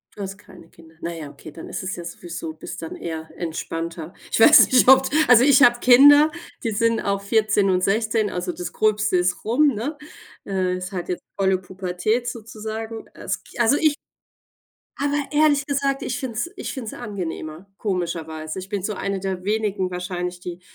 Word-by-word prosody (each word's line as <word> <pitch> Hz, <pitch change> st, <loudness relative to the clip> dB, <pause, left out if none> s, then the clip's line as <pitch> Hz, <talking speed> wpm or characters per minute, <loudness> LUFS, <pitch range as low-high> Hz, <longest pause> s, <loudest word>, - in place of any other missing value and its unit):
Du 205 Hz, -, -8 dB
hast 195 Hz, 0 st, -6 dB
keine 180 Hz, -5 st, -16 dB
Kinder. 160 Hz, -1 st, -19 dB
Na 170 Hz, -, -4 dB
ja, 155 Hz, -3 st, -7 dB
okay, 150 Hz, -, -12 dB
dann 160 Hz, -, -10 dB
ist -, -, -5 dB
es 185 Hz, 0 st, -3 dB
ja 175 Hz, -, -7 dB
sowieso 170 Hz, -1 st, -7 dB
bist 155 Hz, -, -9 dB
dann 165 Hz, -, -6 dB
eher 160 Hz, -1 st, -6 dB
entspannter. 165 Hz, 0 st, -5 dB, 0.2 s
Ich -, -, 0 dB
weiß 300 Hz, +7 st, +9 dB
nicht, 255 Hz, -1 st, +5 dB
ob 265 Hz, +1 st, +8 dB
d -, -, -3 dB
also, 245 Hz, 0 st, +7 dB
ich 280 Hz, +1 st, +5 dB
hab 240 Hz, -4 st, +5 dB
Kinder, 290 Hz, +5 st, +7 dB, 0.3 s
die 225 Hz, -, -1 dB
sind 230 Hz, +2 st, +1 dB
auch 200 Hz, -1 st, -1 dB
14 205 Hz, -1 st, +2 dB
und 180 Hz, -1 st, +1 dB
16, 215 Hz, +1 st, +1 dB
also, 180 Hz, 0 st, -3 dB
das 180 Hz, 0 st, -7 dB
Gröbste 215 Hz, -2 st, +1 dB
ist 180 Hz, 0 st, -1 dB
rum, 250 Hz, +8 st, +3 dB
ne? 275 Hz, +9 st, -4 dB, 0.5 s
Äh, 185 Hz, -2 st, -1 dB
ist 185 Hz, +1 st, -6 dB
halt 180 Hz, -2 st, -5 dB
jetzt 180 Hz, -, -3 dB
volle 190 Hz, -1 st, +2 dB
Pubertät 190 Hz, +5 st, -2 dB
sozusagen. 220 Hz, -1 st, -6 dB
Als -, -, -5 dB
Ki -, -, -14 dB
also 240 Hz, +4 st, +4 dB
ich 310 Hz, -2 st, +2 dB, 1.0 s
Aber 285 Hz, +1 st, 0 dB, 0.2 s
ehrlich 295 Hz, -2 st, +3 dB
gesagt, 275 Hz, -1 st, -1 dB
ich 245 Hz, -, -3 dB
finde 260 Hz, -3 st, -5 dB
es 240 Hz, +10 st, -2 dB
ich -, -, -5 dB
finde 260 Hz, -5 st, -6 dB
es -, -, -6 dB
angenehmer, 180 Hz, -6 st, -6 dB
komischerweise. 165 Hz, -4 st, -4 dB
Ich 185 Hz, -, -8 dB
bin 200 Hz, -3 st, -3 dB
so 210 Hz, -, -2 dB
eine 195 Hz, 0 st, -3 dB
der 190 Hz, -1 st, -4 dB
wenigen 205 Hz, -3 st, -1 dB
wahrscheinlich, 180 Hz, 0 st, -4 dB
die 180 Hz, 0 st, -7 dB
200 Hz, 195 wpm, -22 LUFS, 180-235 Hz, 1.0 s, weiß